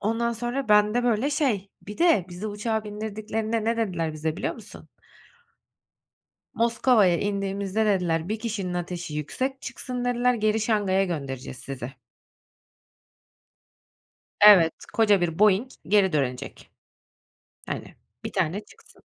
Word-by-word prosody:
ondan 230 +3 0
sonra 240 +2 -3
bende, 210 +3 +4
böyle, 245 +4 +1
şey 235 -10 0
Bir 210 - -9
de 330 - +4
bizi 180 +4 -6
uçağa 220 +1 -2
bindirdiklerinde 215 +1 -3
ne 230 +1 +1
dediler 175 -8 -1
bize 155 +1 -3
biliyor - - -2
musun? - - -13 1.7
"Moskova'ya 230 -5 +3
indiğimizde" 200 +1 -1
dediler, 180 -4 0
"...1 215 +1 -2
kişinin 205 -6 -3
ateşi 175 -3 -4
yüksek 260 - -3
çıksın" 250 -1 -5
dediler, 245 0 +2
"...geri 215 -1 +1
Şangay'a 205 -3 +1
göndereceğiz 135 -7 -5
sizi." 130 -2 -6 2.5
Evet, 190 -6 +8 0.2
koca 210 -4 +4
bir 165 -1 -1
Boeing 210 +4 +4 0.2
geri 195 -3 +3
dönecek. 130 -4 -3 1.0
Hani, - - -6 0.3
1 - - -5
tane 190 +2 -1
çıksın. - - -20
210 Hz, 120 wpm, -25 LUFS, 180-225 Hz, 2.5 s, Evet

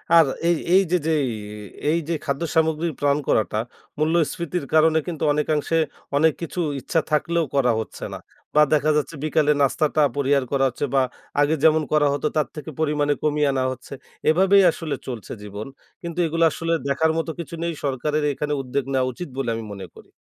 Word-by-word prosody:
আর 165 -1 +8 0.2
এই 170 - +3 0.2
এইযে 185 -2 +4
যেই 150 -4 +2 0.3
এ - - -8 0.4
এই 165 - +2
যে 170 - +1
খাদ্য 140 +1 -2
সামগ্রী 160 0 +2
প্ল্যান 145 0 +2
করাটা 110 -1 +1 0.4
মূল্যস্ফীতির 165 +1 0
কারণে 160 0 +5
কিন্তু 165 -4 -4
অনেকাংশে 150 +2 0 0.4
অনেক 160 +1 +4
কিছু 170 +2 -5 0.2
ইচ্ছা 165 - 0
থাকলেও 165 +2 +1
করা 125 -3 +3
হচ্ছে 110 - -7
না। - - -6 0.4
বা 150 - +7
দেখা 155 0 +3
যাচ্ছে 150 +2 -2
বিকালের 150 -1 +2
নাস্তাটা 155 +2 +1 0.2
পরিহার 140 0 +2
করা 135 -1 +2
হচ্ছে 130 +4 -3
বা 135 - +5 0.4
আগে 145 +2 +3
যেমন 160 0 +5
করা 150 -1 +4
হতো 145 +2 -1
তার 150 - +2
থেকে 150 +1 -7
পরিমাণে 150 -2 +1
কমিয়ে 150 -1 +2
আনা 130 -1 0
হচ্ছে। 130 - -9 0.4
এভাবেই 190 +4 +5
আসলে 160 -2 -4
চলছে 120 -5 -6
জীবন। 105 +3 -7 0.3
কিন্তু 170 0 -5
এগুলা 165 +1 +2
আসলে 165 0 -1
দেখার 155 +3 +2
মতো 165 0 -1
কিছু 170 0 -6
নেই 170 - -1
সরকারের 150 +2 -1
এখানে 150 +2 -2
উদ্যোগ 135 +1 -2
নেয়া 130 -1 +2
উচিত 175 +8 -7
বলে 135 -3 -1
আমি 115 - -5
মনে 95 -1 -8
করি। - - -15
150 Hz, 180 wpm, -23 LUFS, 140-160 Hz, 0.4 s, আর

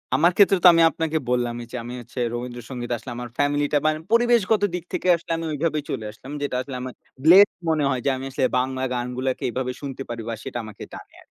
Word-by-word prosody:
আমার 175 +2 +4
ক্ষেত্রে 195 -1 +6
তো - - +10
আমি 165 - +4
আপনাকে 160 -1 -1
বললামই, 120 -1 -1
যে - - -6
আমি 120 +1 -7
হচ্ছে 120 +2 -9
রবীন্দ্রসঙ্গীতে 120 0 -5
আসলে 120 - -9
আমার 120 0 -6
ফ্যামিলিটা 145 +1 +1
মানে 155 0 +1
পরিবেশগত 230 -3 +3
দিক 175 - -4
থেকে - - -2
আসলে 170 - -8
আমি 165 - -4
ওইভাবেই 155 0 -1
চলে 110 -5 -3
আসলাম। 130 +6 -12
যেটা 140 -3 -2
আসলে 130 0 -7
আমার 130 0 -6 0.3
ব্লেসড 185 +2 +7
মনে 155 -2 +2
হয় 130 -3 -1
যে - - +3
আমি 130 - -6
আসলে 130 -1 +1
বাংলা 130 0 -2
গানগুলাকে 125 +1 -2
এভাবে 125 0 -2
শুনতে 135 -1 -6
পারি 115 -1 -4
বা - - -2
সেটা - - -5
আমাকে 105 -2 -10
টানে - - -11
আরকি। - - -20
135 Hz, 215 wpm, -23 LUFS, 125-160 Hz, 0.3 s, তো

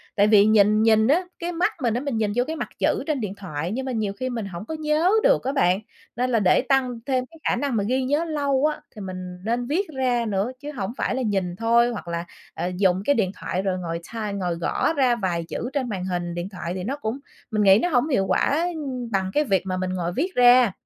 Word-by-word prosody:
Tại 205 0 +4
vì 210 -1 +6
nhìn 215 0 +4
nhìn 220 -1 +4
á, 320 +7 +3 0.2
cái 345 0 -3
mắt 355 +5 0
mình 235 -3 +2
á 240 - 0
mình 280 -5 -2
nhìn 215 -2 0
vô 245 - +3
cái 320 - -3
mặt - - -4
chữ - - +1
trên 305 -3 0
điện 205 -3 -3
thoại, 170 -3 -4
nhưng 260 +4 -3
mà 265 - -3
nhiều 215 -4 -1
khi 255 - -2
mình 235 -4 -3
hổng 185 0 -7
có 320 - -5
nhớ 310 +4 +2
được - - +4
á 265 - -1
bạn, 185 -9 +3 0.4
nên 250 +2 0
là 235 -2 +2
để 190 -3 +4
tăng 255 -2 0
thêm 260 -2 0
cái 325 +5 -18
khả - - +2
năng 280 -4 -1
mà 205 - +1
ghi 260 +1 +1
nhớ 290 +6 +1
lâu 285 -3 0
á, 305 - -1
thì 210 - -8
mình 185 -1 -6
nên 240 +2 -1
viết 360 +8 0
ra 250 -3 +1
nữa 205 +2 -1
chứ 295 +2 -6
hổng 230 -6 -4
phải - - -1
là 260 - -1
nhìn 190 -5 -1
thôi, 235 +3 +3
hoặc 210 -6 -7
là, 170 0 -3 0.3
à, 170 - -3
dùng 180 0 +1
cái 285 - +3
điện 195 -5 +1
thoại 185 - -2
rồi 190 -1 -1
ngồi 170 -2 -4
type, 215 -3 -3
ngồi 180 -4 -2
gõ 170 - 0
ra 260 -5 +3
vài 180 -6 -2
chữ 245 - -4
trên 265 -4 -1
màn 190 -4 -3
hình 175 -2 -3
điện 175 +2 -4
thoại 180 -3 -5
thì 185 - -4
nó 265 +8 -3
cũng 250 -1 -4 0.3
mình 215 -1 +1
nghĩ 195 +1 +7
nó 355 - +2
hổng 255 -2 +2
hiệu 225 -9 +2
quả 320 +5 +2 0.4
bằng 190 -2 0
cái 300 - +3
việc 195 - +1
mà 185 -1 -2
mình 185 0 -2
ngồi 175 -1 -2
viết 350 - -2
ra. 245 -2 +6
225 Hz, 260 wpm, -24 LUFS, 190-265 Hz, 0.4 s, nghĩ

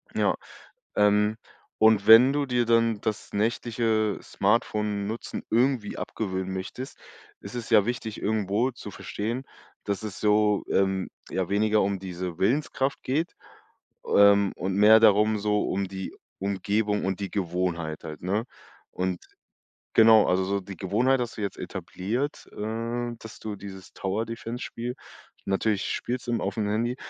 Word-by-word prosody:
Ja, - - +2 0.6
ähm, 105 +1 +3 0.4
und 110 -2 +4
wenn 120 +5 +9
du 145 0 0
dir 125 -2 +1
dann 115 -2 +2
das 110 -1 -4
nächtliche 110 0 0
Smartphone-Nutzen 105 0 -1
irgendwie 120 -2 +1
abgewöhnen 95 -3 -3
möchtest, 95 +8 -6 0.4
ist 100 - -9
es 120 -2 -5
ja 105 -4 +5
wichtig 115 -2 -3
irgendwo 110 +3 0
zu 120 -4 -9
verstehen, 115 +6 -4 0.4
dass 100 0 -3
es 105 -3 -6
so, 105 -1 +3
ähm, 95 -1 +1 0.2
ja, 95 -2 -2
weniger 105 +1 +3
um 100 0 0
diese 90 -2 -5
Willenskraft 135 +4 0
geht, 155 +6 -1 0.8
ähm, 100 -1 +6
und 95 +3 -2
mehr 105 +2 +7
darum 110 0 +5
so 105 0 +1
um 100 +1 -1
die 95 0 -6 0.2
Umgebung 105 +2 0
und 95 0 -1
die 100 -1 -4
Gewohnheit 85 -4 -2
halt, 80 -2 -8
ne, 100 +6 -1 0.5
und 90 -1 -2 0.8
genau, 110 -1 +7
also, 95 +1 +2
so 100 +1 -1
die 100 0 -9
Gewohnheit 125 +7 +1
hast 120 -2 -4
du - - -3
jetzt 100 - -3
etabliert, 120 +10 -4
äh, 115 +3 -3
dass 110 -1 -11
du 105 -2 -5
dieses 95 -1 -10
Tower-Defense 115 +5 -4
Spiel, 120 +1 -5 0.5
natürlich 100 +1 0
spielst 125 0 -4
im 120 -1 0
auf'm 105 -2 -2
Handy, 120 +3 0
105 Hz, 140 wpm, -26 LUFS, 95-115 Hz, 0.8 s, wenn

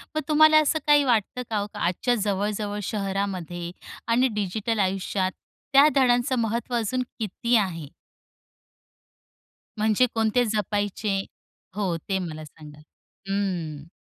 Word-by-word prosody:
मग 310 - +1
तुम्हाला 310 0 +6
असं 310 +1 +1
काही 295 -1 +6
वाटतं 245 -1 +1
का 220 - -1
हो, 205 - -3
आजच्या 185 +8 0
जवळ-जवळ 205 0 -2
शहरामध्ये 190 -4 -3 0.4
आणि 240 +3 +3
डिजिटल 210 +2 -2
आयुष्यात 190 0 0 0.4
त्या 280 +2 +8
धड्यांचं 255 0 +3
महत्त्व 235 +2 -1
अजून 240 +2 0 0.2
किती 235 +3 0
आहे? 170 -8 0 1.9
म्हणजे 215 +3 +3
कोणते 225 +2 +2
जपायचे 205 -1 -1 0.6
हो, 195 -5 -1
ते 190 +4 -2
मला 155 -3 -6
सांगा. 150 -1 -14 0.5
हं. 170 -7 -3
210 Hz, 115 wpm, -25 LUFS, 190-240 Hz, 1.9 s, त्या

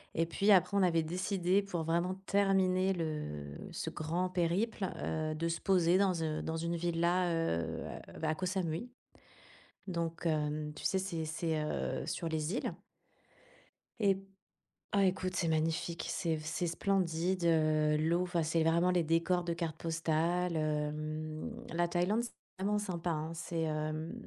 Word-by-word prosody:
et 165 - +2
puis 195 +5 0
après 195 +1 +5
on 200 - +4
avait 165 -3 +3
décidé 185 +3 +1
pour 180 -5 -3
vraiment 170 +3 +1
terminer 190 -1 +3
le 115 - -4 0.2
ce - - -4
grand 170 +4 -1
périple, 185 +4 0
heu, 155 -1 -1
de 165 +2 -1
se 170 0 -2
poser 180 -1 +4
dans 185 -5 +2
un 155 -1 -1
dans 160 0 -2
une 170 +1 -1
villa, 175 +1 +1
heu, 125 - -1 0.2
à - - -12
bah, 160 - 0
à 155 - +1
Koh 185 +3 -2
Samui, 180 +4 -2 1.0
donc, 170 -1 -2
hem, 150 -1 0
tu - - -9
sais, 190 - +2
c'est 175 -4 -2
c'est, 160 0 -1
heu, 150 - -2
sur 165 - -2
les 160 +4 -1
îles - - -2 1.3
et 195 -2 +4 0.7
ah 200 -1 +4
écoute, 185 0 0
c'est 170 - +1
magnifique, 160 +1 0
c'est 165 -2 0
f 155 - -8
c'est 165 +2 -1
splendide, 180 0 0
heu, 155 -2 +3
l'eau 165 +3 +2
enfin, 175 -2 0
c'est 160 +1 +2
vraiment 170 +3 +3
les 180 -2 +3
décors 170 +3 +2
de 170 - -1
carte 165 -2 -3
postale, 165 +2 0
hem, 155 0 -2 0.2
la 175 0 +2
Thaïlande, 185 +7 +1
c'est 235 - -6 0.3
vraiment 210 +1 +2
sympa, 175 -4 -3
hein. 160 +1 -2
C'est, 165 0 -3
hem, 155 +1 -2
170 Hz, 165 wpm, -33 LUFS, 155-185 Hz, 1.3 s, après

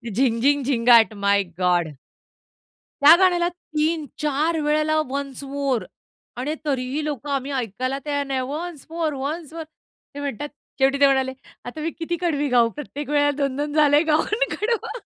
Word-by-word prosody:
झिंग, 235 -2 +2
झिंग, 285 +1 +3
झिंगाट 235 -3 +5
माय 200 0 +2
गॉड! 175 -2 +2 1.1
त्या 300 +4 +9
गाण्याला 350 -2 +3 0.3
3-4 305 0 0
वेळेला 305 +1 +2
वन्स 275 0 -5
मोर 275 -3 -1 0.5
आणि 285 +5 -2
तरीही 270 +1 -1
लोकं 290 -1 -4
आम्ही 275 0 -2
ऐकायला 255 +1 -2
तयार 285 -1 -1
नाही 270 -1 -2
वन्स 300 +3 -5
मोर, 325 -2 -2
वन्स 300 +4 -5
मोर, 330 -1 -5
ते 310 -2 -17
म्हणतात 285 0 -4 0.3
शेवटी 270 +1 +3
ते 280 - +7
म्हणाले 265 -1 +2 0.3
आता 275 +6 -7
मी 325 +1 -2
किती 340 +1 -2
कडवी 295 -4 0
गाऊ? 240 -2 +4
प्रत्येक 290 +1 -7
वेळेला 290 0 +3
2-2 285 +1 -2
झाले 295 -1 +5
गाऊन 430 +10 +1
कडवं 465 +2 -2
285 Hz, 150 wpm, -23 LUFS, 260-310 Hz, 1.1 s, त्या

